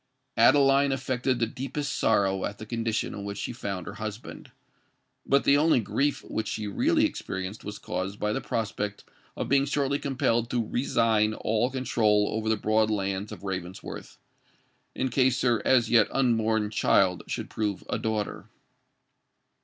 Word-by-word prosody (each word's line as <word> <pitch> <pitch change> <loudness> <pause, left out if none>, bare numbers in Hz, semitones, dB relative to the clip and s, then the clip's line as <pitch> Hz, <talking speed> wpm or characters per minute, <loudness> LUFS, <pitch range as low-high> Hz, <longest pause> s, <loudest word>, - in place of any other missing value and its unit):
Adeline 135 +3 +5
affected 130 -1 -1
the 120 - +1
deepest 135 +4 -4
sorrow 95 -3 +2
at 100 - -3
the 110 - -8
condition 115 0 -2
in 100 - -6
which 100 0 -5
she 120 - -4
found 100 -6 -5
her - - -7
husband;—but 110 +5 -5
the 140 - +5
only 155 -2 +4
grief 140 +6 -1
which 110 - -4
she 110 - -3
really 310 - +2
experienced 95 - -5
was 105 - -6
caused 95 +3 -4
by 105 0 0
the - - -2
prospect 105 -2 -3 0.3
of - - -2
being 140 +1 +3
shortly 140 0 0
compelled 120 -4 0
to 120 -3 -1
resign 110 -4 +1
all 110 +3 0
control 110 -5 +1
over 110 0 -2
the 110 - +2
broad 110 +1 +2
lands 100 -1 -2
of - - -9
Ravensworth, 95 -1 -6 0.8
in 130 - -1
case 130 0 +2
her 120 -3 +2
as 120 -4 +3
yet 115 -3 +5
unborn 110 -4 +1
child 95 -4 +3
should - - -4
prove 105 -3 -2
a - - -2
daughter. 110 -2 -3
110 Hz, 155 wpm, -27 LUFS, 105-130 Hz, 0.8 s, Adeline